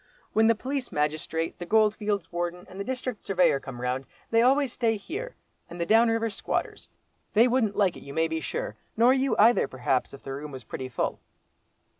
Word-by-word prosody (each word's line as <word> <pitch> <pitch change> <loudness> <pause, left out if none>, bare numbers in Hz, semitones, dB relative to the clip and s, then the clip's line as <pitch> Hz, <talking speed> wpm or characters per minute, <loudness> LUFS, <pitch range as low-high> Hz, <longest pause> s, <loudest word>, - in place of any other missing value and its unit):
When 220 +1 +4
the 230 - +5
police 265 +3 -4
magistrate, 155 +2 -2
the 175 - -5
Goldfields 210 -2 +1
Warden, 175 +1 -3
and 190 - -11
the - - -1
District 255 -1 -4
Surveyor 180 -7 +3
come 130 -2 -8
round, 125 +2 -2 0.2
they 230 0 +5
always 265 +1 +3
stay 225 -3 +1
here, 435 - -6 0.3
and 175 - -9
the 170 - 0
down 225 +4 +5
river 225 0 0
squatters. 200 - -3 0.5
They 230 +4 +7
wouldn't 240 -5 +1
like 195 -4 +2
it, - - -10
you 140 - -9
may 160 +3 +1
be 160 0 -3
sure, - - -4 0.2
nor 240 +3 +6
you 270 0 +1
either, 230 - +5
perhaps, 130 0 -1
if 140 - -12
the 135 - -5
room 145 +2 -6
was 130 -2 -8
pretty 130 +4 -6
full." 120 - -2
205 Hz, 200 wpm, -27 LUFS, 155-235 Hz, 0.5 s, They